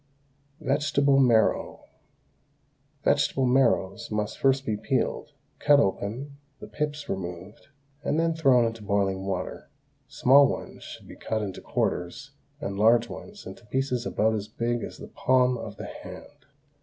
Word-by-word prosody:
VEGETABLE 140 Hz, -1 st, +2 dB
MARROW. 115 Hz, -5 st, +2 dB, 1.2 s
Vegetable 135 Hz, -, +2 dB
marrows 120 Hz, -4 st, +2 dB
must 105 Hz, -1 st, -2 dB
be -, -, -21 dB
first 135 Hz, 0 st, +3 dB, 0.2 s
peeled, 140 Hz, +2 st, -1 dB, 0.3 s
cut 145 Hz, 0 st, +5 dB
open, 125 Hz, +6 st, -2 dB, 0.2 s
the -, -, -8 dB
pips 150 Hz, -1 st, -4 dB
removed, 90 Hz, +2 st, -6 dB, 0.4 s
and 155 Hz, -, 0 dB
then 165 Hz, 0 st, +2 dB
thrown 135 Hz, -7 st, +4 dB
into 115 Hz, -1 st, -4 dB
boiling 100 Hz, -2 st, -1 dB
water; 95 Hz, -2 st, -4 dB, 0.4 s
small 140 Hz, +2 st, +5 dB
ones -, -, -6 dB
should -, -, -10 dB
be -, -, -11 dB
cut 110 Hz, -1 st, -3 dB
into 95 Hz, -3 st, -6 dB
quarters 105 Hz, +11 st, -2 dB, 0.3 s
and 100 Hz, -9 st, -4 dB
large 115 Hz, +2 st, +4 dB
ones 205 Hz, -1 st, -10 dB
into -, -, -10 dB
pieces 130 Hz, -1 st, -1 dB
about 110 Hz, +1 st, +1 dB
as 105 Hz, -1 st, -3 dB
big 120 Hz, +2 st, -2 dB
as -, -, -7 dB
the -, -, -9 dB
palm 125 Hz, -1 st, +2 dB
of 115 Hz, -, -7 dB
the -, -, -7 dB
hand. -, -, -11 dB
120 Hz, 145 wpm, -26 LUFS, 105-140 Hz, 1.2 s, cut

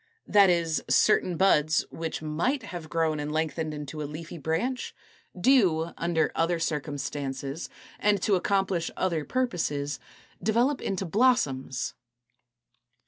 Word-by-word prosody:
That 200 Hz, -2 st, +6 dB
is, 170 Hz, -2 st, +1 dB
certain 185 Hz, -5 st, +3 dB
buds, 155 Hz, -4 st, +3 dB
which 160 Hz, -1 st, -4 dB
might 175 Hz, -, 0 dB
have 175 Hz, -6 st, -7 dB
grown 160 Hz, -2 st, 0 dB
and 145 Hz, 0 st, -3 dB
lengthened 155 Hz, 0 st, -1 dB
into 150 Hz, 0 st, -6 dB
a 145 Hz, -, -4 dB
leafy 165 Hz, +2 st, -7 dB
branch, 170 Hz, -, -2 dB, 0.4 s
do, 175 Hz, -8 st, +3 dB
under 170 Hz, -1 st, 0 dB
other 170 Hz, +1 st, +1 dB
circumstances 145 Hz, -2 st, -3 dB, 0.3 s
and 205 Hz, -1 st, +3 dB
to 210 Hz, -, +2 dB
accomplish 190 Hz, -2 st, +1 dB
other 170 Hz, -5 st, 0 dB
purposes, 160 Hz, -, -1 dB, 0.4 s
develop 235 Hz, +8 st, +2 dB
into 195 Hz, 0 st, -2 dB
blossoms. 160 Hz, -, +1 dB
165 Hz, 120 wpm, -27 LUFS, 150-195 Hz, 0.4 s, That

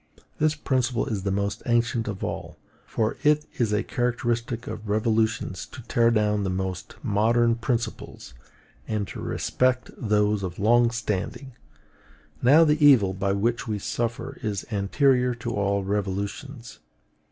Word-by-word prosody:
This 155 Hz, 0 st, +2 dB
principle 130 Hz, -5 st, 0 dB
is 110 Hz, -7 st, -3 dB
the 100 Hz, -, -2 dB
most 100 Hz, +1 st, -1 dB
ancient 120 Hz, -1 st, +1 dB
of 100 Hz, -3 st, -4 dB
all; -, -, -5 dB, 0.3 s
for 110 Hz, -1 st, -1 dB
it 150 Hz, 0 st, +3 dB
is 115 Hz, -4 st, +2 dB
a 105 Hz, 0 st, +1 dB
characteristic 120 Hz, -1 st, -2 dB
of 110 Hz, -1 st, -7 dB
revolutions 110 Hz, -4 st, 0 dB
to 125 Hz, -, -11 dB
tear 115 Hz, 0 st, +3 dB
down 105 Hz, -2 st, +1 dB
the 95 Hz, -, -1 dB
most 95 Hz, -1 st, -4 dB
modern 115 Hz, +3 st, +3 dB
principles, 115 Hz, -, -4 dB, 0.5 s
and 105 Hz, -2 st, -2 dB
to -, -, -7 dB
respect 125 Hz, 0 st, 0 dB
those 105 Hz, -2 st, +1 dB
of 90 Hz, -2 st, -5 dB
long 120 Hz, +3 st, +4 dB
standing. 115 Hz, +3 st, -3 dB, 0.9 s
Now 145 Hz, +7 st, +7 dB
the 150 Hz, -1 st, +2 dB
evil 115 Hz, -10 st, +6 dB
by 100 Hz, +1 st, -1 dB
which 115 Hz, +5 st, -1 dB
we 105 Hz, -2 st, -1 dB
suffer 120 Hz, +6 st, -3 dB
is 105 Hz, -3 st, -3 dB
anterior 125 Hz, +5 st, +2 dB
to 115 Hz, 0 st, -5 dB
all 100 Hz, -2 st, 0 dB
revolutions. 100 Hz, +6 st, -4 dB
115 Hz, 140 wpm, -25 LUFS, 100-120 Hz, 0.9 s, Now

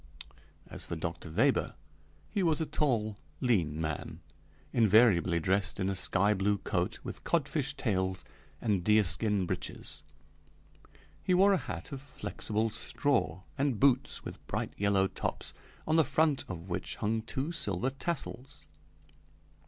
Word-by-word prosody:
As -, -, -5 dB
for -, -, -4 dB
Dr. 85 Hz, +1 st, -5 dB
Weber, 80 Hz, -, +2 dB, 0.6 s
he 200 Hz, -, 0 dB
was 165 Hz, -4 st, +2 dB
a 160 Hz, -, 0 dB
tall, 110 Hz, -10 st, 0 dB, 0.2 s
lean 85 Hz, -11 st, +1 dB
man, 80 Hz, -2 st, -3 dB, 0.5 s
invariably 105 Hz, -6 st, +5 dB
dressed 95 Hz, +4 st, 0 dB
in 95 Hz, 0 st, +1 dB
a 100 Hz, -, -1 dB
sky 95 Hz, +3 st, +3 dB
blue 100 Hz, +1 st, +1 dB
coat 100 Hz, +2 st, -1 dB
with -, -, -7 dB
codfish 145 Hz, -3 st, 0 dB
tails 95 Hz, -, -1 dB, 0.3 s
and 100 Hz, -6 st, 0 dB
deerskin 105 Hz, 0 st, +3 dB
breeches. -, -, -5 dB, 1.2 s
He 185 Hz, -, +2 dB
wore 195 Hz, +2 st, +6 dB
a -, -, +4 dB
hat -, -, -6 dB
of 135 Hz, -2 st, -5 dB
flexible 110 Hz, -5 st, -2 dB
straw 105 Hz, -, 0 dB, 0.2 s
and 135 Hz, -6 st, +1 dB
boots 135 Hz, -1 st, +2 dB
with -, -, -8 dB
bright -, -, -2 dB
yellow 100 Hz, -1 st, +3 dB
tops, -, -, -3 dB, 0.3 s
on 160 Hz, +1 st, +2 dB
the 160 Hz, -, +7 dB
front 145 Hz, +1 st, +2 dB
of 90 Hz, -1 st, -7 dB
which 90 Hz, +1 st, -3 dB
hung 110 Hz, +1 st, 0 dB
two 135 Hz, +7 st, -2 dB
silver 125 Hz, -, -1 dB
tassels. 135 Hz, -3 st, -5 dB
110 Hz, 135 wpm, -31 LUFS, 95-140 Hz, 1.2 s, the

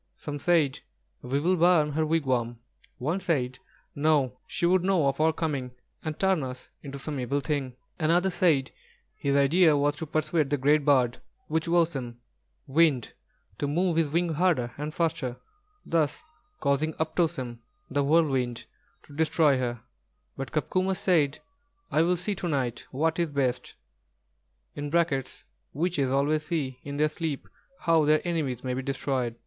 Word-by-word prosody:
Some 145 Hz, -1 st, -6 dB
said, 155 Hz, -4 st, +2 dB, 0.4 s
"We 135 Hz, +3 st, -1 dB
will 180 Hz, +5 st, +2 dB
burn 170 Hz, -3 st, +4 dB
her 160 Hz, +2 st, 0 dB
wigwam;" 130 Hz, -7 st, 0 dB, 0.4 s
one 155 Hz, +9 st, -1 dB
said: 130 Hz, -9 st, -1 dB, 0.3 s
"No, 145 Hz, -4 st, +1 dB
she -, -, -1 dB
would 180 Hz, +1 st, +3 dB
know 185 Hz, -5 st, +2 dB
of 135 Hz, +2 st, 0 dB
our 160 Hz, +1 st, +4 dB
coming 140 Hz, -6 st, -3 dB, 0.3 s
and 155 Hz, -1 st, -4 dB
turn 190 Hz, -4 st, +2 dB
us 130 Hz, -1 st, -7 dB
into 140 Hz, -1 st, -7 dB
some 145 Hz, 0 st, -4 dB
evil 135 Hz, +3 st, 0 dB
thing!" 140 Hz, -4 st, -2 dB, 0.2 s
Another 175 Hz, +4 st, +2 dB
said 160 Hz, -7 st, +2 dB, 0.4 s
his 140 Hz, 0 st, -1 dB
idea 150 Hz, +3 st, +5 dB
was 145 Hz, +1 st, +1 dB
to 160 Hz, -, -5 dB
persuade 155 Hz, -1 st, 0 dB
the 145 Hz, -, +1 dB
great 145 Hz, +3 st, +3 dB
bird, 130 Hz, -4 st, +3 dB, 0.3 s
Wūchowsen, 160 Hz, -6 st, +1 dB, 0.5 s
Wind, 145 Hz, -4 st, +2 dB, 0.5 s
to 145 Hz, -, 0 dB
move 170 Hz, +4 st, +1 dB
his 165 Hz, -2 st, +2 dB
wings 165 Hz, 0 st, 0 dB
harder 155 Hz, -9 st, +1 dB
and 150 Hz, +2 st, -4 dB
faster, 150 Hz, -7 st, -1 dB, 0.5 s
thus 165 Hz, -, 0 dB, 0.4 s
causing 145 Hz, +2 st, +1 dB
"Uptossem," 160 Hz, -7 st, -1 dB, 0.3 s
the 140 Hz, +1 st, 0 dB
Whirlwind, 135 Hz, -6 st, +1 dB, 0.4 s
to -, -, -16 dB
destroy 155 Hz, -3 st, +3 dB
her; 120 Hz, -2 st, -2 dB, 0.5 s
but 135 Hz, -2 st, -5 dB
Copcomus 185 Hz, +4 st, 0 dB
said: 155 Hz, -6 st, +2 dB, 0.5 s
"I 155 Hz, -, +3 dB
will 175 Hz, +2 st, +2 dB
see 190 Hz, +4 st, -2 dB
to 185 Hz, -, -4 dB
night 130 Hz, -6 st, -2 dB
what 160 Hz, +5 st, 0 dB
is 170 Hz, -2 st, +1 dB
best." 130 Hz, -3 st, -1 dB, 2.0 s
(Witches 150 Hz, -4 st, 0 dB
always 150 Hz, +3 st, +1 dB
see 135 Hz, -6 st, -2 dB
in 140 Hz, 0 st, -6 dB
their 150 Hz, +1 st, +3 dB
sleep 155 Hz, -2 st, -4 dB, 0.3 s
how 165 Hz, -2 st, +4 dB
their 155 Hz, +3 st, +2 dB
enemies 145 Hz, -8 st, -2 dB
may 130 Hz, -1 st, -2 dB
be 130 Hz, -, -2 dB
destroyed). 130 Hz, -3 st, -2 dB
150 Hz, 150 wpm, -27 LUFS, 135-165 Hz, 2.0 s, idea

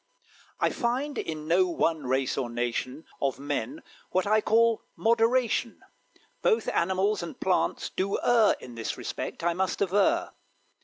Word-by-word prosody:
I -, -, +2 dB
Find 260 Hz, +5 st, -1 dB
in 155 Hz, -1 st, -5 dB
no 180 Hz, +3 st, +4 dB
one 165 Hz, -4 st, 0 dB
race 130 Hz, 0 st, 0 dB
or 130 Hz, -3 st, -2 dB
nation 120 Hz, +4 st, -3 dB, 0.2 s
Of 135 Hz, -1 st, 0 dB
men 145 Hz, -, -4 dB, 0.3 s
what 185 Hz, 0 st, +1 dB
I 215 Hz, +1 st, +3 dB
call 230 Hz, +1 st, +3 dB
moderation; 230 Hz, +1 st, +1 dB, 0.6 s
Both 455 Hz, -2 st, +2 dB
animals 190 Hz, +3 st, +1 dB
and 170 Hz, -, -7 dB
plants 185 Hz, -1 st, 0 dB
do 195 Hz, +1 st, -1 dB
err 230 Hz, -3 st, +4 dB
In 125 Hz, -, -10 dB
this 115 Hz, -1 st, -4 dB
respect, -, -, -5 dB
I 175 Hz, 0 st, +2 dB
must 185 Hz, +2 st, -1 dB
aver. 205 Hz, -, +2 dB
185 Hz, 145 wpm, -27 LUFS, 150-230 Hz, 0.6 s, no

